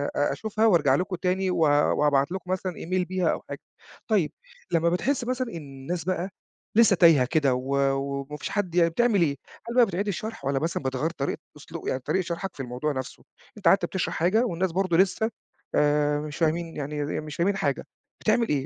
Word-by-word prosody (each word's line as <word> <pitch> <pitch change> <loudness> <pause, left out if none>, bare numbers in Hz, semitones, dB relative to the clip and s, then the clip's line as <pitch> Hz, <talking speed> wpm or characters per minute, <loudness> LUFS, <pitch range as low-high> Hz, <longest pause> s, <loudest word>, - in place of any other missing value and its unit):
آآ 145 - +2
أشوفها 220 0 -1
وأرجع 150 -10 +4
لكم 185 +4 -1
تاني 185 +1 0
و - - -1 0.4
وأبعت 145 +1 +3
لكم 185 -1 -5
مثلًا 185 0 -1
Email 180 +2 -2
بيها 185 -1 0
أو - - -3
حاجة. - - -5 0.5
طيب 200 -9 +2 0.4
لما 170 0 +3
بتحس 240 +10 0
مثلًا 255 +1 -2
إن 200 - -7
الناس 145 +3 -6
بقى 185 +1 -2 0.5
لسه 220 -3 +6
تايهة 165 -7 +6
كده 140 -1 +2
و 130 +2 -2 0.2
وما 140 +1 -4
فيش - - -5
حد 185 -5 -2
يعني 170 -1 +5
بتعمل 210 +2 +2
إيه؟ 145 -4 +2 0.3
هل 235 - -4
بقى 245 -2 +7
بتعيد 195 +1 -3
الشرح 205 -5 -4
والّا 135 -1 +1
مثلًا 160 -2 -2
بتغيَّر 130 +4 -1
طريقة 145 -4 -3 0.2
أسلوب - - -9
يعني 130 - 0
طريقة 185 +8 0
شرحك 175 +1 -5
في 135 - -5
الموضوع 125 +4 -2
نفسه؟ 130 -2 -6 0.3
أنت 200 - -1
قعدت 195 - +5
بتشرح 190 - -2
حاجة 210 +9 +2
والناس 180 -3 -1
برضه 185 -2 +1
لسه، 200 +4 +2 0.4
آآ، 150 0 +2
مش 150 0 -6
فاهمين 165 0 0
يعني 150 +1 -4
ي - - -2 0.2
ي - - -1
مش 155 -1 -7
فاهمين، 195 +3 +1
حاجة 140 -5 -1 0.4
بتعمل 225 +1 +2
إيه 140 -3 0
170 Hz, 205 wpm, -26 LUFS, 145-190 Hz, 0.5 s, بقى